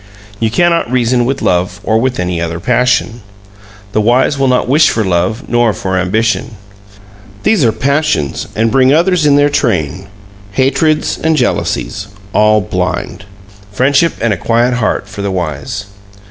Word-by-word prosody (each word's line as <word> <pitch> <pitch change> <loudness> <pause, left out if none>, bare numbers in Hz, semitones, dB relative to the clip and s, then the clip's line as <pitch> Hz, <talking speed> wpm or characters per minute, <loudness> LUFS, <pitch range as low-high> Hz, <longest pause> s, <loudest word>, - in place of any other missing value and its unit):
You 110 - +1
cannot 170 +1 +1
reason 120 -1 +1
with 135 +2 -2
love 95 +2 0
or 110 0 +1
with 130 0 -1
any 90 -1 -2
other 85 0 -3
passion. 120 +1 0 0.7
The 110 - +1
wise 125 +6 +2
will 135 - +2
not 125 -1 +1
wish 150 +5 +4
for 110 - 0
love 95 +7 -1
nor 120 -2 +2
for 95 -1 -3
ambition. 110 +5 -1 0.9
These 215 -9 +2
are 115 - +3
passions 140 - -1
and 115 +1 +1
bring 130 0 +4
others 170 +1 +2
in 140 - +4
their 145 0 +3
train 95 - -1 0.5
hatreds 150 +5 +1
and 160 -1 +1
jealousies 120 -5 -2 0.3
all 105 0 +3
blind. 90 0 -3 0.5
Friendship 140 +9 +2
and 115 -1 +1
a - - -3
quiet 120 +6 +1
heart 110 -4 -1
for 100 +1 -8
the 100 - -2
wise. 85 +1 -4
115 Hz, 155 wpm, -13 LUFS, 100-135 Hz, 0.9 s, wish